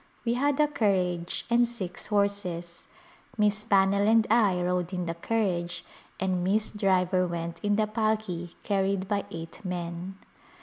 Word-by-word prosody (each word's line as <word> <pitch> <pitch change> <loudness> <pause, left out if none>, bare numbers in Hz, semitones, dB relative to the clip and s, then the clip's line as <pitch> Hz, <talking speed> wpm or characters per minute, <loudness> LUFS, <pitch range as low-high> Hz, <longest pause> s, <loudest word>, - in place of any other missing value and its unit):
We 235 - +2
had 280 +3 +1
a 300 - +5
carriage 180 - 0
and 240 0 +4
six 195 -7 -6
horses. 190 -4 -1 0.5
Miss 210 0 +2
Pannell 200 -1 +3
and 225 0 +5
I 210 -6 +4
rode 180 0 -1
in 180 -1 -2
the 165 - -2
carriage 175 -2 -1 0.3
and 185 -2 0
Miss 210 +4 +1
Driver 185 -3 +2
went 170 -1 -4
in 205 -1 +2
the 215 +1 +2
palki 215 -6 -2
carried 195 -1 0
by 200 0 -1
eight 165 +6 -8
men. 175 0 -4
195 Hz, 145 wpm, -28 LUFS, 180-215 Hz, 0.5 s, a